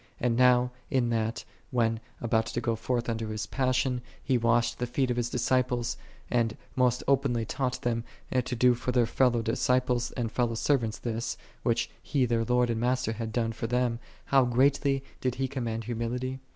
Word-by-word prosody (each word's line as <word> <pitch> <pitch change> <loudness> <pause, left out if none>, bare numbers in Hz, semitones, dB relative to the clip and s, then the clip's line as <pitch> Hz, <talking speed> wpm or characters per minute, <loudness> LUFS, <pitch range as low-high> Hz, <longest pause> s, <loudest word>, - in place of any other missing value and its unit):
And 120 -1 +1
now, 125 0 +4 0.2
in 120 -3 +1
that, 115 0 -1 0.2
when 115 -2 +1 0.2
about 110 -1 +1
to 120 - -2
go 115 -1 0
iortii 120 +1 -2
unto 115 -1 -2
His 110 0 -3
1'assion, 130 -1 0 0.2
He 135 - +1
washed 115 0 +2
the 125 - -1
feet 125 +1 0
of - - 0
His 120 -1 0
disciples, 125 -1 +1 0.4
and 115 -2 +1 0.2
most 125 -2 +2
openly 130 -4 +2
taught 130 +2 -2
them 115 -1 0 0.3
to 125 0 0
do 125 +1 +5
for 120 +1 -2
their 125 -1 +3
fellow 120 0 +2
disciples 125 +1 +1
and 115 -3 -2
fellow 120 -1 0
servants 115 -3 +1
this, 115 -1 -3 0.2
which 115 -1 +1
He 135 -3 +1
their 115 -1 +1
Lord 125 0 +2
and 115 0 -2
Master 125 -1 +1
had 110 0 -4
done 115 0 0
for 115 +1 -4
them; 120 -1 0 0.3
how 135 -1 +4
greatly 135 +2 +2 0.2
did 130 -1 0
He 135 0 -1
commend 120 -4 -3
humility?' 125 +3 -3
120 Hz, 180 wpm, -28 LUFS, 115-125 Hz, 0.4 s, do